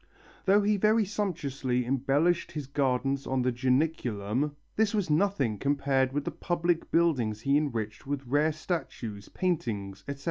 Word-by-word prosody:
Though 200 +1 +5
he 210 0 +2
very 215 +2 +3
sumptuously 140 - -2
embellished 140 +7 +1
his 150 -3 -4
gardens 135 0 0
on 130 -1 0
the 125 - +2
Janiculum, 130 -1 0 0.2
this 220 0 +2
was 195 -7 0
nothing 150 - +1
compared 140 -2 +1
with 145 +1 -2
the - - -2
public 170 -1 -1
buildings 125 -11 +2
he 140 +3 +2
enriched 115 -7 -2
with 140 -1 -3
rare 145 +5 +2
statues, 135 - -5
paintings, 105 - -2
etc. 140 0 -5
140 Hz, 145 wpm, -29 LUFS, 125-170 Hz, 0.2 s, Though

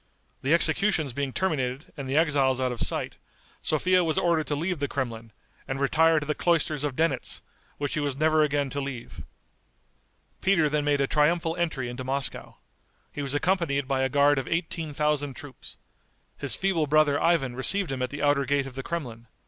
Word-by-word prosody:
The 140 +5 +3
executions 160 - +3
being 140 +1 -2
terminated 135 -6 -2
and 140 -4 -6
the 135 - +1
exiles 140 -5 +2
out 130 -1 0
of 120 - -4
sight, - - 0 0.4
Sophia 180 +4 +2
was 160 -2 -1
ordered 170 -3 +1
to 145 - -1
leave 170 +2 -2
the 140 - -1
Kremlin, 115 -5 -4 0.4
and 135 0 -3
retire 160 +3 +3
to 145 - -6
the 150 - -1
cloisters 155 -3 +1
of 145 -3 -2
Denitz, 165 +3 0 0.3
which 145 -1 -3
she - - -1
was 145 -2 -2
never 155 +1 +3
again 145 -2 0
to 140 - -3
leave. 135 -4 -7 1.2
Peter 175 -6 +3
then 150 0 0
made 145 -1 +2
a - - +3
triumphal 165 +3 +1
entry 155 -8 -2
into 120 +2 -6
Moscow. 135 +1 -1 0.6
He 145 - -6
was 140 0 -3
accompanied 145 -5 0
by 135 -1 0
a 130 - +1
guard 145 +1 +3
of 130 - -5
eighteen 165 -2 -2
thousand 145 -2 0
troops. 140 -4 -11 0.6
His - - +1
feeble 180 -6 0
brother 145 -1 +3
Ivan 145 -8 +1
received 170 +6 +2
him 130 -1 -3
at 125 - -1
the 145 - -5
outer 145 -1 +2
gate 140 0 +1
of 135 - -8
the 135 - -5
Kremlin. 125 -8 -6
145 Hz, 190 wpm, -26 LUFS, 135-160 Hz, 1.2 s, The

